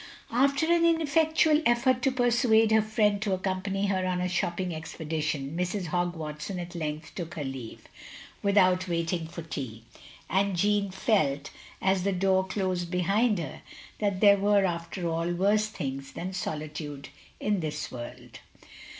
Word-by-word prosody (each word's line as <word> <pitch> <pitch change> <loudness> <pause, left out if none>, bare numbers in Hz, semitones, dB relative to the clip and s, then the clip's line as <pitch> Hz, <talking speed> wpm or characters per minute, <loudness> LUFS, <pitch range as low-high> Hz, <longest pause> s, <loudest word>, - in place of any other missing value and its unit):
" - - -22
After 275 +5 +3
an 340 +1 +3
ineffectual 315 -1 +3
effort 245 +1 +3
to 270 - +2
persuade 240 -3 +3
her 220 0 +5
friend 210 -1 +1
to 200 -2 0
accompany 190 +1 -1
her 190 -2 0
on 180 -1 0
a 180 - 0
shopping 180 0 -1
expedition, 155 -2 -3
Mrs. 180 +2 -1
Hogg 175 +1 -1
Watson 155 +4 -5
at 175 0 -6
length 155 -1 -4
took 170 -3 -6
her 155 - -3
leave, 135 -4 -7 0.5
without 185 -2 +3
waiting 170 -1 -1
for 170 0 -8
tea; 125 -8 -6 0.4
and 195 +1 +1
Jeanne 205 +2 +2
felt, 155 - 0 0.3
as 190 -1 +3
the 195 +2 0
door 190 0 +2
closed 185 -2 -2
behind 200 +5 +2
her, 160 -6 -5 0.4
that 200 -3 0
there 200 -1 +7
were, 200 0 +3
after 170 0 -3
all, 165 +1 -1
worse 205 +4 +2
things 135 -8 -5
than 185 +2 -5
solitude 150 -4 -5 0.3
in 210 -2 0
this 155 -2 -4
world. 120 -1 -9
185 Hz, 155 wpm, -28 LUFS, 165-210 Hz, 0.5 s, there